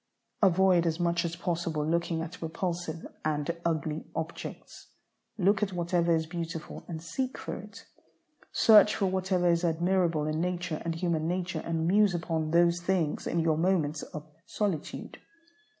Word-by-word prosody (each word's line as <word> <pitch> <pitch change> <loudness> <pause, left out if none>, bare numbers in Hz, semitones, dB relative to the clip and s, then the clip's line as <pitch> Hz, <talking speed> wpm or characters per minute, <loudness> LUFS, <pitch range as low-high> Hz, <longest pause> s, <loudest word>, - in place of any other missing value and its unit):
Avoid 185 -2 +4
as 165 +1 -1
much 170 0 +1
as 170 -1 -3
possible 165 -3 -2
looking 165 0 0
at 165 +1 -8
repulsive 170 0 -3 0.2
and 155 +2 -1
ugly 160 -2 -2
objects. 160 +1 -6 0.5
Look 200 0 +3
at 200 -2 0
whatever 170 -1 +1
is 160 0 0
beautiful 165 0 -6
and 165 -3 -5
seek 260 +9 -3
for - - -5
it. - - -11 0.7
Search 210 -1 +6
for 200 - 0
whatever 185 -1 +1
is 170 0 +3
admirable 170 -1 +1
in 155 +1 -1
nature 175 -2 -2
and 165 -1 -2
human 165 -2 0
nature, 180 0 -2
and 165 -1 -1
muse 200 +1 +4
upon 165 -2 -1
those 170 +1 +3
things 175 -4 0
in 170 - +1
your 160 -1 +2
moments 160 -4 +1
of 150 -1 -8 0.2
solitude. 195 -8 -3
170 Hz, 150 wpm, -29 LUFS, 160-180 Hz, 0.7 s, Search